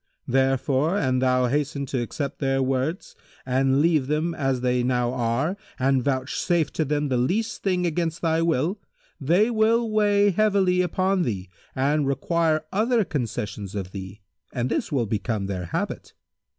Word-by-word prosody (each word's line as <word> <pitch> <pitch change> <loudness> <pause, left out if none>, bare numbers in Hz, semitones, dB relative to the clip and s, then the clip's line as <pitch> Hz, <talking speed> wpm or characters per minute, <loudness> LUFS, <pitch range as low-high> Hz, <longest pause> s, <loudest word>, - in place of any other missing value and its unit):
Therefore 135 +5 +1
an 130 -7 +1
thou 130 0 +2
hasten 140 +2 -1
to 130 -1 -2
accept 140 +4 -4
their 135 -1 +1
words 135 +7 -2 0.3
and 135 +2 +2
leave 155 -5 +2
them 155 +3 0
as 135 -4 -1
they 125 0 +1
now 125 -1 0
are 125 +8 0 0.2
and 130 -1 +2
vouchsafe 140 +5 0
to 160 - 0
them 150 0 -1
the 130 - +1
least 190 - -1
thing 180 -2 0
against 165 0 -2
thy 165 0 +2
will, 165 +4 0 0.4
they 175 - +3
will 230 +1 +2
weigh 205 -1 +3
heavily 195 -2 +2
upon 185 +2 +1
thee 100 - -3 0.2
and 140 +2 +1
require 155 +3 +1
other 225 +2 +2
concessions 110 - -4
of 95 -2 -4
thee, 95 0 -8 0.3
and 125 -1 -2
this - - -1
will 130 -5 +1
become 105 -1 -2
their 95 -2 -4
habit. - - -4
140 Hz, 155 wpm, -24 LUFS, 125-175 Hz, 0.4 s, they